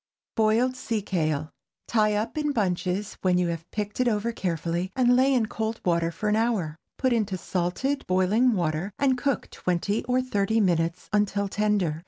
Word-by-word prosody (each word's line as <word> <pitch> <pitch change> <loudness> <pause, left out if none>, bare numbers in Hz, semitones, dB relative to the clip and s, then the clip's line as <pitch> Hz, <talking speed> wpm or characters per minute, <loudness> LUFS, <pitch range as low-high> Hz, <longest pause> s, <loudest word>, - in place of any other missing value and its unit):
BOILED 225 +4 +2
SEA 225 -4 -2
KALE. 155 -5 -1 0.4
Tie 215 -2 +2
up 215 +2 -2
in 300 -1 0
bunches 190 -1 -1
when 180 -1 +3
you 180 -1 +1
have 165 0 -5
picked 210 +1 -4
it 250 - +3
over 225 0 +1
carefully, 175 -2 -2
and 245 -1 +4
lay 260 +2 +4
in 245 -4 +3
cold 220 +1 -3
water 170 -2 +2
for 210 - -4
an 210 - +3
hour. 215 -9 0 0.2
Put 260 -2 +2
into 210 -5 0
salted 185 +12 -2
boiling 200 +7 +3
water, 170 0 -1
and 270 -2 +3
cook 260 +1 -1
twenty 185 +4 -1
or 250 +1 +2
thirty 220 -3 +1
minutes 170 -3 +1
until 205 -1 +1
tender. 200 -6 0
210 Hz, 175 wpm, -26 LUFS, 180-235 Hz, 0.4 s, and